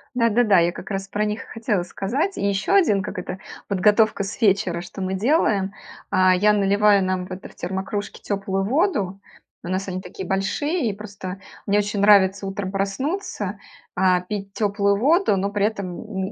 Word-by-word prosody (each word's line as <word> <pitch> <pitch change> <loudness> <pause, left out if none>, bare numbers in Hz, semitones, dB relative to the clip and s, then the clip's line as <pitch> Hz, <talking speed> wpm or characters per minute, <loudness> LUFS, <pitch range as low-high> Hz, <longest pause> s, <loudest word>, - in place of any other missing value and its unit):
Да-да-да, 230 -4 +4
я 170 +1 +2
как - - -9
раз 195 0 -3
про 210 +2 -1
них 210 +1 -2
и - - -20
хотела 215 -5 -1
сказать. 260 - -2
И - - -1
ещё 200 - 0
один, 215 - +4
как 185 - -6
это, 185 +1 -5 0.3
подготовка 210 +2 +3
с 195 - -7
вечера, 190 -4 +2
что 190 +2 -9
мы 190 0 -2
делаем. 205 - +2 0.4
А, 185 -1 +4
я 210 +3 +4
наливаю 205 0 +4
нам 185 -1 -1
в 185 - -13
это 185 - -7
в - - -18
термокружки 190 +3 -4
теплую 195 -1 -2
воду. 205 - 0 0.4
У - - -7
нас 190 +1 -2
они 185 0 -4
такие 180 0 -8
большие. 240 - 0
И - - -2
просто 195 -2 -8 0.3
мне 205 +1 +2
очень 205 -1 0
нравится 200 -1 +5
утром 195 -1 -4
проснуться, 210 - -2 0.4
а, 185 -1 +3
пить 195 +1 -5
теплую 200 -1 +1
воду, 300 - +3
но 200 +1 0
при 205 0 0
этом 200 -5 -3
н 190 -3 -4
200 Hz, 185 wpm, -23 LUFS, 190-210 Hz, 0.4 s, нравится